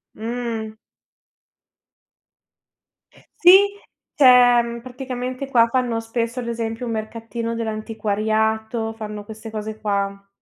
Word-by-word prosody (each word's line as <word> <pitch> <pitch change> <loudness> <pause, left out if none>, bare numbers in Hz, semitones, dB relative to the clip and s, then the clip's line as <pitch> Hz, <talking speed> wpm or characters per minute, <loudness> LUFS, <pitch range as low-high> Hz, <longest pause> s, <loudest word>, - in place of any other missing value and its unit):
Mh. 225 -1 -4 2.7
Sì, 355 +1 +9 0.6
cioè, 280 -4 +6 0.3
ehm, 235 0 -3
praticamente 255 +1 -5
qua 235 -3 +5
fanno 240 -2 0
spesso, 230 +2 -3
ad 235 - -5
esempio, 230 +1 -3
un - - -3
mercatino 230 +1 -4
dell'antiquariato, 220 0 -1
fanno 210 -2 -7
queste 220 +1 -9
cose 215 0 -6
qua. 200 -1 -2
225 Hz, 100 wpm, -22 LUFS, 220-235 Hz, 2.7 s, Sì